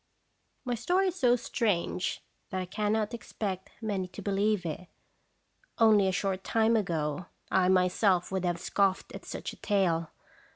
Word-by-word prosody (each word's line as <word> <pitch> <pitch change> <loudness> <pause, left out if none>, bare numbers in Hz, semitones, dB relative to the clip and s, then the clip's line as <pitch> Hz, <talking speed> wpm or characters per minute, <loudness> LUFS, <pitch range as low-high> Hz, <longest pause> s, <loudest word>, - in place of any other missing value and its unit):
My 245 - -1
story 360 - +2
is 365 - -7
so 245 -1 +5
strange 210 -7 -1 0.3
that 185 - -2
I 185 - -2
cannot 210 +4 -1
expect 195 -5 -4
many 200 -4 -1
to 180 - -9
believe 200 -1 +1
it. 170 +3 -5 0.9
Only 215 -4 +5
a - - +2
short 190 0 -1
time 225 0 +2
ago 170 -5 -1 0.2
I 185 -1 +3
myself 180 0 +3
would 190 -1 -1
have 175 -1 0
scoffed 195 +1 0
at - - -9
such - - -5
a - - -14
tale. 170 -6 +1
195 Hz, 155 wpm, -29 LUFS, 180-220 Hz, 0.9 s, so